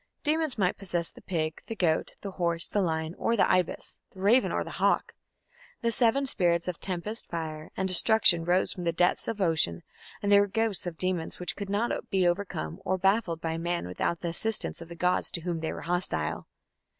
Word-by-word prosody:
Demons 310 -3 0
might 185 -3 +1
possess 175 -4 -2
the - - -15
pig, 155 -3 -3
the 225 - -4
goat, 165 -5 0
the 200 - -5
horse, 170 -2 +1
the 205 - 0
lion, 160 -2 -1
or 230 - +1
the - - +4
ibis, 185 -2 0 0.2
the - - -12
raven, 220 +7 +4
or - - 0
the - - -8
hawk. - - +1 0.7
The 235 - +1
seven 240 +4 +2
spirits 175 -8 +1
of 180 -2 -3
tempest, 195 +5 -4
fire, 160 -2 -5
and 190 - 0
destruction 185 -2 +6
rose 180 +2 +2
from 180 - -7
the 170 - +1
depths 175 +2 +1
of 225 -2 -3
ocean, 155 - +1 0.4
and 205 - +1
there 200 0 +8
were 205 -1 -1
hosts 225 -5 0
of 165 -2 -5
demons 185 -3 -2
which 180 - -2
could 200 -1 -6
not 210 +4 -1
be 190 -2 +2
overcome 175 - -2
or 190 - 0
baffled 190 -3 +1
by 165 0 -2
man 170 +1 -2
without 90 - -2
the 170 - -2
assistance 215 +2 -2
of 165 - -8
the 170 - -9
gods 180 +2 +1
to 170 - -4
whom 170 -1 -2
they 160 - -3
were - - -6
hostile. 175 - -2
180 Hz, 210 wpm, -28 LUFS, 165-200 Hz, 0.7 s, there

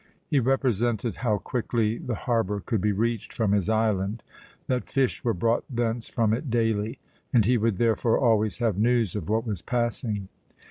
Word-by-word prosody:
He 145 - +2
represented 120 -3 0
how 110 -4 +1
quickly 115 -1 -1
the 120 - -3
harbour 110 -4 0
could 110 0 -2
be 105 - +2
reached 115 +2 -1
from 110 -4 0
his 100 -1 +1
island, 110 -1 0 0.4
that 125 -1 -2
fish 135 -2 0
were 115 -4 +1
brought 115 +6 +1
thence 120 -2 -2
from 110 -3 +1
it 130 +5 -2
daily, 115 -2 0 0.3
and 120 -7 +4
he 125 +4 +3
would 115 -3 +1
therefore 115 +1 +2
always 110 -6 +2
have 110 -5 0
news 115 -3 +2
of 95 -6 -4
what 110 +2 +1
was 105 -7 -3
passing. 115 -3 -2
115 Hz, 175 wpm, -26 LUFS, 105-120 Hz, 0.4 s, and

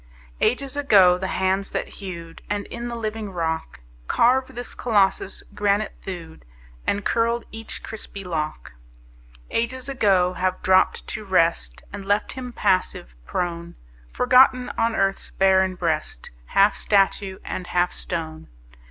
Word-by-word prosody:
Ages 275 +2 +1
ago 195 -11 +5
the 190 - -2
hands 190 +1 0
that - - -3
hewed, 170 -4 -8
And 205 -1 -2
in 235 0 -5
the 240 - -4
living 220 -2 -4
rock 160 - -3 0.3
Carved 260 +2 +2
this 245 0 -5
Colossus, 200 -4 +2
granite 205 0 +1
thewed 170 -4 -8 0.4
And 200 0 0
curled 230 +1 +1
each 225 0 -6
crispy 205 -2 -7
lock: 155 - -4 0.8
Ages 255 +3 -1
ago 195 -9 +2
have 185 0 -2
dropped 185 0 +3
to 215 - -5
rest 165 - +1
And 200 -1 -6
left 205 +2 0
him 255 -1 -6
passive, 185 - 0
prone, 170 -1 -3 0.4
Forgotten 255 0 +4
on 230 0 +1
earth's 195 0 +1
barren 190 -1 +3
breast, 160 - -2 0.2
Half 200 +1 +4
statue 195 -1 +1
and 180 - -5
half 180 0 +1
stone. 160 -2 -5
195 Hz, 135 wpm, -23 LUFS, 180-225 Hz, 0.8 s, ago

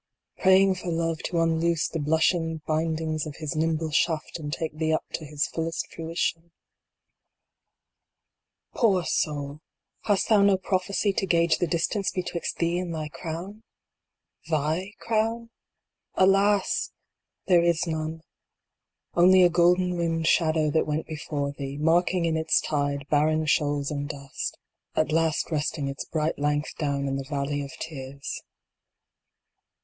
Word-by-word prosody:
Praying 190 +1 +5
for 185 -1 -8
Love 165 -1 -1
to 170 - -1
unloose 165 0 +2
the 165 - -4
blushing 160 +2 +1
bindings 160 0 -1
of 150 - -7
his 155 -2 -4
nimble 160 0 0
shaft 160 +1 0
and 145 -2 -5
take 160 0 -3
thee 160 0 0
up 155 - 0
to 160 - -4
his 150 +1 -1
fullest 165 0 -4
fruition 165 0 -3 2.2
I - - -10
Poor 195 -7 +4
Soul! 145 -1 -2 0.4
hast 205 -3 +2
thou 215 -3 +5
no 200 -1 +5
prophecy 195 +2 0
to 195 - -1
gauge 170 -1 +3
the 175 - +1
distance 175 +5 0
betwixt 180 -2 -3
thee 170 +1 +1
and 175 -2 -4
thy 155 -1 -4
crown? 175 +7 -7 0.9
TTiy 160 +6 -1
crown? 230 +1 -1 0.6
Alas! 195 +1 +3 0.5
there 175 -2 +5
is 170 -1 +2
none. 160 -1 -4 0.9
Only 185 +2 +6
a 175 - +6
golden 180 +1 +3
rimmed 165 -2 -1
shadow 155 -2 +3
that 160 - +1
went 155 +1 -1
before 145 -2 -3
thee, 140 -1 -6
marking 170 +3 +2
in 165 -1 +1
its 160 0 +2
tide 145 -2 -1
barren 155 +1 +3
shoals 145 -2 +1
and 145 -1 -3
dust. 140 -1 -5 0.4
At 155 - +1
last 165 +1 +1
resting 150 -1 -1
its 135 0 -5
bright 155 -1 -1
length 145 +1 -1
down 140 -2 -1
in 135 0 -1
the 135 -1 -6
valley 145 0 -1
of 140 -1 -6
tears. 140 -3 -6
160 Hz, 145 wpm, -26 LUFS, 150-175 Hz, 2.2 s, Only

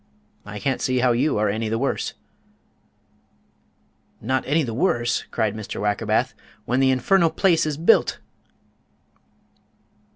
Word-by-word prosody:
I 105 0 -7
can't 130 +6 -2
see 130 0 0
how 125 0 +3
you 120 +4 +1
are 105 0 +1
any 110 +2 -2
the 115 - -1
worse." 135 +4 -2 2.0
"Not 130 +4 -1
any 155 +3 +2
the 115 -4 -4
worse?" 120 -4 0
cried 110 -3 -1
Mr. 110 -2 -6
Wackerbath, 105 -1 0 0.3
"when 125 +3 0
the 135 0 +4
infernal 165 +7 +3
place 165 -1 +2
is 150 -2 -3
built!" 170 +8 +3
125 Hz, 130 wpm, -23 LUFS, 110-150 Hz, 2.0 s, the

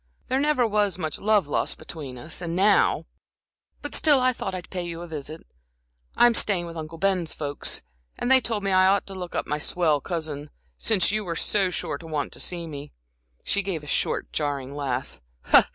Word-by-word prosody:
"There 260 - +2
never 290 -4 +3
was 205 -4 +1
much 155 -4 -3
love 210 -3 +3
lost 145 - -1
between 150 -5 -7
us, 155 +7 -6
and 170 -1 -3
now 200 +3 +4 0.8
but 290 - -4
still 295 -4 +5
I 255 0 +3
thought 195 -5 -4
I'd 180 -1 -8
pay 185 - -2
you 170 -1 -5
a - - -7
visit. 155 0 -7 0.7
I'm 240 0 +7
staying 195 -6 +1
with 170 0 -8
Uncle 160 0 -6
Ben's 180 -2 +1
folks, 145 -1 -2 0.3
and 245 - 0
they 260 0 +7
told 220 -3 -2
me 195 - +1
I 185 0 +6
ought 200 +1 +3
to 195 - -8
look 180 -2 -6
up - - 0
my 150 +1 -1
swell 155 -2 +1
cousin 155 -4 -4 0.3
since 200 - +2
you 215 0 0
were 170 -3 -3
so 195 +2 +2
sure 180 - -3
to 165 - -10
want 150 -2 -2
to - - -5
see 175 -2 -2
me" 145 -2 -8 0.5
she 200 - +1
gave 185 -6 -3
a - - -9
short, - - -1
jarring 140 -2 -2
laugh. 135 -2 -3
175 Hz, 200 wpm, -25 LUFS, 155-200 Hz, 0.8 s, I'm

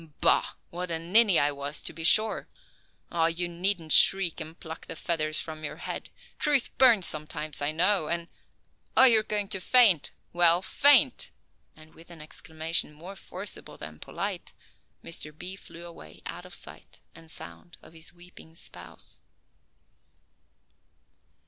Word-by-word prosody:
Bah, - - +2 0.2
what 180 +1 -6
a 165 - -1
ninny 190 +3 +3
I 145 +1 +3
was, 140 +1 -4
to - - -4
be 165 - -9
sure! 215 +6 +5 0.6
Oh, 165 -1 +1
you 170 +1 -3
needn't 175 -1 -3
shriek 180 -2 +4
and 160 +1 -10
pluck 160 +1 -10
the - - -7
feathers 155 -2 -1
from 155 -1 -6
your 145 - -6
head. - - -6 0.3
Truth 285 -4 +2
burns 235 -8 +5
sometimes, 155 0 -6
I 145 +1 0
know, 180 +1 +1
and 170 0 -3 0.7
oh - - +8
you 230 -4 +7
are - - -4
going 210 -2 -2
to 195 - -4
faint. 200 - +4 0.2
Well 175 +1 +4
faint!" 280 +4 +4 0.5
and 155 0 -18
with 165 +1 -17
an 170 -2 -12
exclamation 160 +1 -1
more 175 +6 -11
forcible 190 +1 -9
than 75 0 -10
polite - - -6 0.5
Mr. 150 -2 -9
B. 185 +3 -7
flew 170 -3 -13
away 80 - -14
out - - -7
of - - -7
sight - - -12
and 165 -1 -15
sound 85 - -10
of - - -17
his 160 -1 -10
weeping 175 -2 -17
spouse. 90 - -9
170 Hz, 155 wpm, -27 LUFS, 155-190 Hz, 0.7 s, oh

